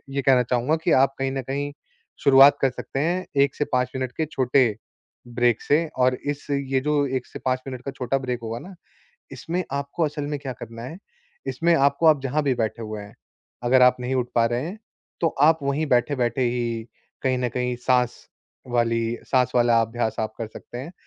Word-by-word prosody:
ये 140 - +1
कहना 130 -2 +4
चाहूँगा 125 +5 +1
कि 170 - +2
आप 135 +1 +4
कहीं 135 0 0
न 135 0 -2
कहीं 140 +3 -3 0.5
शुरुआत 140 +1 +7
कर 135 - +4
सकते 130 +2 -6
हैं 175 +5 0 0.2
1 140 -1 +2
से 145 - -1
5 125 0 +1
मिनट 130 -1 -2
के 160 - 0
छोटे 130 -2 +2 0.6
ब्रेक 120 -1 +1
से 155 +3 +2
और 125 0 +4 0.2
इस 145 - -8
ये 135 -1 0
जो 145 0 +1
1 125 - -7
से - - -9
5 130 0 +1
मिनट 130 -2 -6
का 140 - -3
छोटा 130 0 -1
ब्रेक 125 -2 -3
होगा 115 +1 -4
ना, 190 +6 -11 0.6
इसमें 175 +3 -3
आपको 140 +4 -2
असल 150 -1 -4
में 145 0 -2
क्या 135 -2 -5
करना 115 -1 -9
है। 135 +8 -7 0.5
इसमें 170 +1 +2
आपको 140 +2 +2
आप 150 -3 +5
जहाँ 140 +3 -1
भी 140 -2 +2
बैठे 115 0 -2
हुए 110 -1 -5
हैं, 100 0 -12 0.5
अगर 130 +1 +4
आप 125 0 +6
नहीं 125 +1 -2
उठ 125 -1 0
पा 115 -1 +4
रहे 120 +4 -1
हैं, 185 +6 -6 0.4
तो 165 - +4
आप 160 +2 +5
वहीं 140 +3 0
बैठे-बैठे 125 -1 +1
ही 120 -2 -1 0.4
कहीं 130 -1 +1
न 125 -1 -1
कहीं 125 +1 -2
साँस 125 0 +1 0.5
वाली 115 -1 0
साँस 125 -2 +2
वाला 120 -1 +4
अभ्यास 115 0 -2
आप 110 0 -2
कर 115 - -4
सकते 115 +2 -10
हैं। 135 +7 -7
130 Hz, 205 wpm, -24 LUFS, 120-140 Hz, 0.6 s, शुरुआत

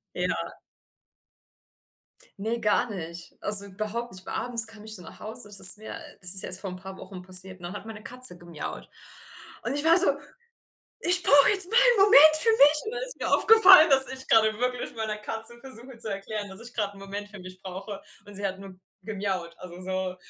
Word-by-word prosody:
Ja. - - -7 1.8
Ne, 225 +3 -7
gar 215 +3 -3
nicht. 170 -3 -12
Also, 200 -1 +6
überhaupt 215 +4 -9
nicht. 185 0 -6
Weil - - -11
abends 235 -2 +1
kam 215 -2 -16
ich 220 0 -8
dann 180 - -13
nach - - -18
Hause. 215 -1 -4
Das 200 - 0
ist 185 +2 +9
mir 220 - -12 0.2
das 180 +2 +6
ist 190 - +4
erst 185 +1 -2
vor 195 - -9
'n 180 - -12
paar 190 +1 -14
Wochen 185 -2 -15
passiert, 185 0 +2
ne, 175 +2 -12
hat 205 - -13
meine 215 -1 -14
Katze 250 -8 +2
gemiaut. 170 -3 -12 0.8
Und - - -7
ich 290 - -1
war 330 +2 +2
so: 370 - +4 0.9
„Ich 355 +1 +5
brauche 280 -2 +3
jetzt 385 -3 +5
mal 460 - -1
'n - - +2
Moment 310 -5 +4
für 455 +8 +4
mich!“ 300 -7 +1
Und 435 - -9
dann - - -9
ist - - -12
mir - - -7
aufgefallen, 385 -7 +3
dass 265 -2 +8
ich 265 0 -11
grade 220 -1 -1
wirklich 250 -1 -7
meiner 215 -1 -8
Katze 225 +2 -3
versuche 260 -1 -11
zu 225 - -8
erklären, 205 +1 -10
dass 190 +3 -11
ich 245 - -14
gerade 205 -3 -7
'n - - -17
Moment 200 +1 -11
für 210 - -16
mich 185 0 -16
brauche. 195 +2 -12 0.2
Und 205 -1 -9
sie 200 0 -4
hat 190 0 -11
nur 195 -1 -16 0.3
gemiaut. 190 -5 -8
Also, 180 -1 -15
so. 185 0 -8
210 Hz, 210 wpm, -22 LUFS, 190-255 Hz, 1.8 s, ist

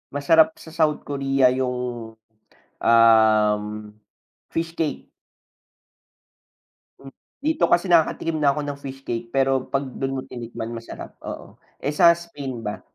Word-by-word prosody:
Masarap 160 +2 +4
sa 160 - -12
South 155 -2 +1
Korea, 135 -2 +2
yung, 125 -3 -3 0.7
um, 110 -2 +5 0.9
fish 165 0 -3
cake. 155 -4 -3 1.9
Hmm 135 0 -12 0.3
dito 315 0 +2
kasi 175 +2 +3
nakakatikim 165 -2 +2
na 140 - +4
ako 150 - 0
ng 145 -1 -5
fish 135 0 -8
cake, 115 0 -4
pero 135 0 0
'pag 135 0 -1
do'n 135 +1 -4
mo - - -3
tinikman, 120 -1 -7
masarap, 115 0 -9
oo, - - -9 0.2
eh, 145 +2 -3
sa 170 +3 +6
Spain 140 -9 -7
ba? 105 - -4
135 Hz, 130 wpm, -23 LUFS, 115-150 Hz, 1.9 s, sa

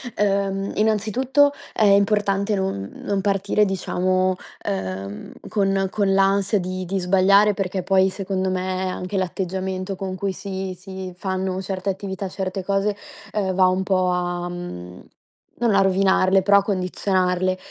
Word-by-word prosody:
ehm, 195 -1 0
innanzitutto, 230 +7 +2 0.2
è - - +1
importante 200 0 +3
non 190 - -2
non 200 -1 0
partire, 200 +1 +1
diciamo, 185 -1 0 0.3
ehm, 95 +1 -4 0.2
con 195 -2 +1
con 200 -2 +1
l'ansia 195 +1 +3
di 185 +1 -4
di 195 +3 -2
sbagliare, 195 +3 +4
perché 190 -1 -2
poi, 190 0 +4
secondo 190 -1 -2
me, 185 0 -2
anche 185 +2 -4
l'atteggiamento 190 +1 -3
con 190 -1 -4
cui 195 +1 -2
si 190 0 -5
si 190 -1 -7
fanno 190 0 -2
certe 190 0 -3
attività, 190 0 -4
certe 190 0 -4
cose, 200 +2 0 0.4
ehm, 200 -3 0
va 185 0 +4
un 185 +1 +1
po' 185 -1 +1
a 175 0 -2
mhmm, 90 - -8 0.6
non 235 -4 +2
a 195 - +5
rovinarle, 190 0 +3
però 200 +1 +5
a - - -3
condizionarle. 185 -1 0
190 Hz, 140 wpm, -22 LUFS, 185-200 Hz, 0.6 s, a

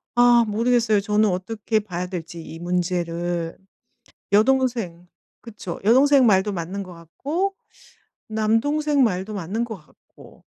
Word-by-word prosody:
아 240 -1 +6
모르겠어요. 225 0 +2
저는 210 +1 +2
어떻게 210 +4 -1
봐야 180 -4 -5
될지, 170 -2 -7
이 160 - -9
문제를. 175 -1 -2 0.8
여동생 225 -6 +1 0.4
그쵸 205 -7 -7
여동생 265 +5 +5
말도 205 -1 +3
맞는 185 +2 -4
거 180 -1 -11
같고 290 - -3 0.7
남동생 270 +7 +1
말도 195 -1 -1
맞는 200 +5 -2
거 225 -2 -6
같고 150 - -20
210 Hz, 250 characters per minute, -23 LUFS, 180-235 Hz, 0.8 s, 아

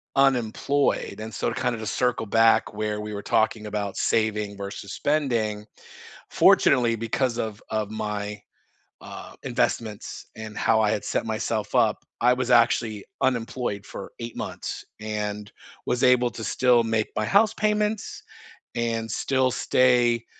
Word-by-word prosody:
unemployed 135 +1 +1
and 110 0 -7
so - - -1
to - - -4
kinda 125 -2 0
just 110 -5 -3
circle 125 -3 0
back 115 +2 +4
where 105 0 -2
we 105 0 -6
were 100 - -6
talking 110 0 +1
about 105 -2 -3
saving 105 -2 0
versus 100 0 -6
spending, 115 -8 0 0.7
fortunately 120 -4 +5
because 115 +2 -1
of 110 -3 -4
of 110 -1 -2
my, 105 -1 -4 0.6
uh, - - -9
investments 110 -3 -2
and 110 -1 -8
how 110 -1 +3
I 105 -1 +3
had 105 - -2
set - - -1
myself 110 -1 -2
up, - - +3 0.2
I 125 +1 +6
was 125 -1 -2
actually 115 -3 +3 0.2
unemployed 120 -4 -1
for - - -8
8 115 0 -6
months - - -5 0.2
and 105 -1 -4 0.4
was 125 - 0
able 125 -1 +4
to 115 0 -8
still 125 -1 +3
make 110 -1 0
my 110 - 0
house 205 - +4
payments 210 0 -1 0.5
and 115 -1 -1
still 130 +2 +1
stay, 120 -2 +3
115 Hz, 145 wpm, -25 LUFS, 105-125 Hz, 0.7 s, I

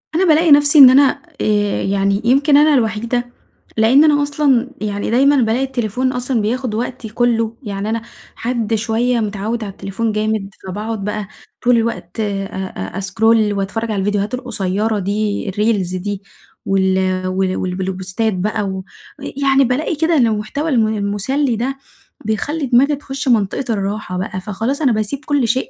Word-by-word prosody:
أنا 370 +3 +3
بالاقي 320 -1 +4
نَفسي 290 +1 +6
إن 265 -2 +11
أنا 270 +1 +4 0.2
آآ 205 -1 +1
يعني 195 +1 0
يمكن 280 +4 +4
أنا 300 +1 +5
الوحيدة 235 0 0 0.5
لإن 235 +7 +5
أنا 295 -2 +4
أصلًا 280 -4 +1
يعني 205 -1 -2
دايمًا 275 +4 +4
بالاقي 240 0 +1
التليفون 255 -1 -1
أصلًا 250 -2 -1
بياخد 235 +1 -2
وقتي 240 0 -4
كُلّه، 230 0 0
يعني 205 -1 -4
أنا 230 +1 -1 0.3
حد 230 -2 -2
شوية 235 +2 0
متعود 215 +2 -3
على 200 - -5
التليفون 195 +4 -3
جامد، 215 -1 -1 0.2
فباقعُد 210 +2 -4
بقى 210 0 -3 0.4
طول 245 0 +4
الوقت 225 -5 -3
أ 200 -2 -2 0.5
أ - - -4
أسكرول 210 +3 +2
وأتفرج 205 +3 -3
على 205 - -1
الفيديوهات 205 +3 -1
القصيرة 210 -3 -1
دي 205 +1 -2
الReels 195 -3 0
دي، 200 0 -4 0.4
وال 190 -1 +1
وال 185 0 0
والبل 185 +1 -2
بوستات 190 +4 -2
بقى، 210 +3 -1
و 190 -1 -4 0.4
آآ - - -6
يعني 275 0 +4
بالاقي 265 +6 0
كده 320 +2 +1
إن 245 -4 +4
المحتوى 220 +9 -2
الم 230 -6 +2
المُسلّي 220 +6 -1
ده، 260 +5 -3 0.5
بيخلّي 285 +8 -2
دماغي 265 +4 +3
تخُشّ 275 -1 -6
منطقة 230 +2 +1
الراحة 200 -2 -3
بقى، 185 0 -4
فخلاص 225 +8 -3
أنا 270 -5 +3
باسيب 220 +6 -2
كُلّ 285 -5 +1
شيء 255 +4 0
220 Hz, 160 wpm, -18 LUFS, 200-255 Hz, 0.5 s, إن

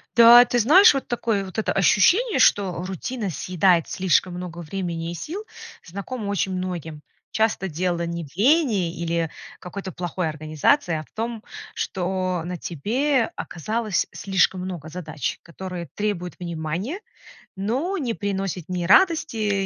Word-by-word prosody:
Да, 240 +1 +9
ты 245 - 0
знаешь, 335 - +7
вот 275 - -3
такое 225 -5 -1
вот 185 - -10
это - - 0
ощущение, 340 - +3
что 185 -7 +3
рутина 195 +3 -4
съедает 175 +1 +2
слишком 185 0 +1
много 175 -1 -7
времени 170 -1 -4
и - - -5
сил, 325 - -6 0.4
знакомо 200 +5 -6
очень 190 -1 -1
многим. 175 -5 -5 0.3
Часто 220 -3 +1
дело 175 +1 -1
не 170 -1 -4
в 140 - -18
лени 210 - +2
или 170 -1 -1 0.3
какой-то 190 +1 -7
плохой 175 0 -3
организации, 155 - +1
а 155 - -3
в - - -25
том, 225 0 -4 0.3
что 185 -1 -2
на 180 0 -4
тебе 235 - 0
оказалось 215 +3 -2
слишком 190 -1 +1
много 175 -4 -6
задач, 155 -5 -4
которые 175 0 -7
требуют 200 -4 -2
внимания, 170 - -4 0.6
но 255 - -1
не 255 -9 -2
приносят 195 -5 -3
ни 180 -2 -2
радости, 215 - +3
190 Hz, 140 wpm, -23 LUFS, 170-225 Hz, 0.6 s, Да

